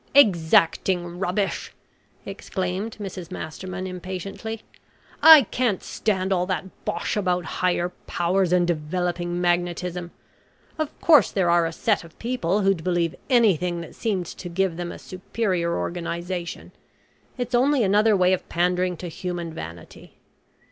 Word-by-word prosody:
"Exacting 175 Hz, -, +3 dB
rubbish!" 190 Hz, +2 st, -2 dB, 0.5 s
exclaimed 190 Hz, +4 st, -4 dB
Mrs 185 Hz, -4 st, -6 dB
Masterman 185 Hz, +4 st, -6 dB
impatiently; 190 Hz, +4 st, -6 dB, 0.6 s
"I 320 Hz, -3 st, +10 dB
can't 235 Hz, -7 st, 0 dB
stand 190 Hz, -3 st, -1 dB
all 180 Hz, -1 st, 0 dB
that 185 Hz, -3 st, -2 dB, 0.2 s
bosh -, -, -2 dB
about 180 Hz, -4 st, 0 dB
higher 175 Hz, +1 st, 0 dB, 0.2 s
powers, 180 Hz, +1 st, +1 dB
and 180 Hz, -1 st, +4 dB
developing 175 Hz, +2 st, -2 dB
magnetism. 175 Hz, 0 st, -1 dB, 0.7 s
Of 310 Hz, -1 st, -3 dB
course 300 Hz, -, +6 dB
there 180 Hz, -3 st, +1 dB
are 170 Hz, -1 st, +4 dB
a -, -, -4 dB
set 205 Hz, +4 st, 0 dB
of 165 Hz, -1 st, -16 dB
people 220 Hz, -5 st, -1 dB
who'd 195 Hz, -4 st, +1 dB
believe 175 Hz, -2 st, 0 dB, 0.2 s
anything 180 Hz, -, +3 dB
that 165 Hz, -, -10 dB
seemed 200 Hz, -6 st, -2 dB
to 175 Hz, +1 st, -8 dB
give 185 Hz, 0 st, 0 dB
them 175 Hz, 0 st, -4 dB
a -, -, -8 dB
superior 185 Hz, -2 st, -2 dB
organisation; 175 Hz, 0 st, -4 dB, 0.7 s
it's 245 Hz, 0 st, -4 dB
only 260 Hz, +1 st, +3 dB
another 210 Hz, +1 st, +4 dB
way 185 Hz, 0 st, +4 dB
of 185 Hz, -, -3 dB
pandering 180 Hz, +1 st, +1 dB
to 180 Hz, -, -6 dB
human 170 Hz, 0 st, -5 dB
vanity. 85 Hz, -, -10 dB
180 Hz, 135 wpm, -24 LUFS, 175-195 Hz, 0.7 s, I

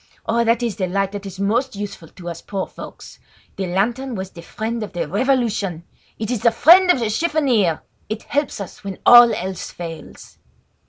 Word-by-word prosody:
Oh! 235 Hz, +1 st, +1 dB
That 230 Hz, +1 st, +2 dB
is 225 Hz, -5 st, -2 dB
the 185 Hz, -3 st, -1 dB
light 195 Hz, +1 st, -1 dB
that 200 Hz, -1 st, -6 dB
is 190 Hz, 0 st, -9 dB
most 225 Hz, +5 st, 0 dB
useful 200 Hz, -5 st, -7 dB
to 175 Hz, +2 st, -12 dB
us 170 Hz, -1 st, -7 dB
poor 195 Hz, -2 st, -4 dB
folks. -, -, -11 dB, 0.4 s
The 190 Hz, -1 st, -3 dB
lantern 235 Hz, +8 st, -1 dB
was 190 Hz, -1 st, -5 dB
the 170 Hz, -, -11 dB
friend 225 Hz, +5 st, -4 dB
of 210 Hz, -, -6 dB
the 175 Hz, -, -2 dB
revolution! 210 Hz, -7 st, 0 dB, 0.3 s
It 220 Hz, +1 st, -3 dB
is 240 Hz, -4 st, -2 dB
the 235 Hz, -, +5 dB
friend 350 Hz, +10 st, +6 dB
of 360 Hz, -, +5 dB
the 230 Hz, -3 st, -1 dB
chiffonier! 250 Hz, -, +1 dB, 0.3 s
It 215 Hz, 0 st, -4 dB
helps 290 Hz, -5 st, -2 dB
us 200 Hz, 0 st, -8 dB
when 195 Hz, -2 st, -6 dB
all 240 Hz, -1 st, +9 dB
else 190 Hz, -3 st, -4 dB
fails." 165 Hz, -2 st, -10 dB
210 Hz, 195 wpm, -20 LUFS, 190-240 Hz, 0.4 s, all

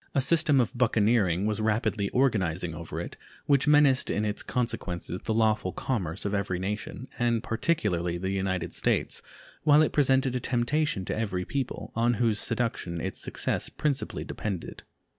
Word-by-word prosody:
A -, -, +4 dB
system 155 Hz, 0 st, +4 dB
of 120 Hz, -2 st, 0 dB
buccaneering 110 Hz, -6 st, +2 dB
was 110 Hz, 0 st, 0 dB
rapidly 105 Hz, -2 st, 0 dB
organizing 95 Hz, -10 st, +1 dB
over 85 Hz, 0 st, -6 dB
it -, -, -6 dB, 0.3 s
which 140 Hz, 0 st, +3 dB
menaced 145 Hz, -3 st, +5 dB
in 105 Hz, -, 0 dB
its 105 Hz, -1 st, -1 dB
consequences 100 Hz, -7 st, -3 dB
the 110 Hz, -, -2 dB
lawful 110 Hz, -4 st, +2 dB
commerce 95 Hz, -8 st, -3 dB
of 100 Hz, -, -1 dB
every 100 Hz, -3 st, -1 dB
nation, 105 Hz, +7 st, -4 dB
and 120 Hz, -1 st, +1 dB
particularly 105 Hz, -, 0 dB
the 95 Hz, +2 st, -2 dB
United 95 Hz, -2 st, -2 dB
States, -, -, 0 dB, 0.4 s
while 150 Hz, 0 st, +6 dB
it -, -, 0 dB
presented 135 Hz, -2 st, +3 dB
a -, -, +1 dB
temptation 125 Hz, -3 st, 0 dB
to -, -, -2 dB
every 100 Hz, -5 st, -2 dB
people, 135 Hz, -2 st, -4 dB
on 120 Hz, +1 st, +2 dB
whose 110 Hz, -2 st, +1 dB
seduction 115 Hz, -7 st, -1 dB
its -, -, -4 dB
success -, -, -2 dB
principally 145 Hz, -3 st, -2 dB
depended. 100 Hz, -5 st, -5 dB
110 Hz, 160 wpm, -28 LUFS, 95-130 Hz, 0.4 s, while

